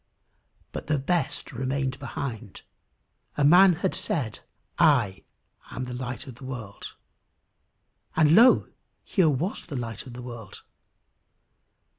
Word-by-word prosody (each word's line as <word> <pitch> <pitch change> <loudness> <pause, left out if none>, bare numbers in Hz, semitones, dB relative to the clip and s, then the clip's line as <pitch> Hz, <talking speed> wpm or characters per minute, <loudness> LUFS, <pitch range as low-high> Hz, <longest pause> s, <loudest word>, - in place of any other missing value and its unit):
But - - -7
the 150 0 +2
best 145 0 -1
remained 130 +1 -2
behind. 120 -6 -6 0.7
A 145 - +2
man 180 +5 +7
had 180 +3 -1
said, 120 -9 -2 0.4
"I 125 - +3 0.5
am 130 - -5
the 125 0 -6
light 125 -1 -5
of 130 - -9
the 125 - -15
world," 120 -6 -8 1.2
and 155 -1 +5
lo! 235 +7 +6 0.4
here 185 -6 +2
was 150 +8 -2
the 150 - -6
light 115 +1 -5
of 125 - -9
the 125 0 -8
world. 120 -5 -9
130 Hz, 125 wpm, -26 LUFS, 120-155 Hz, 1.2 s, man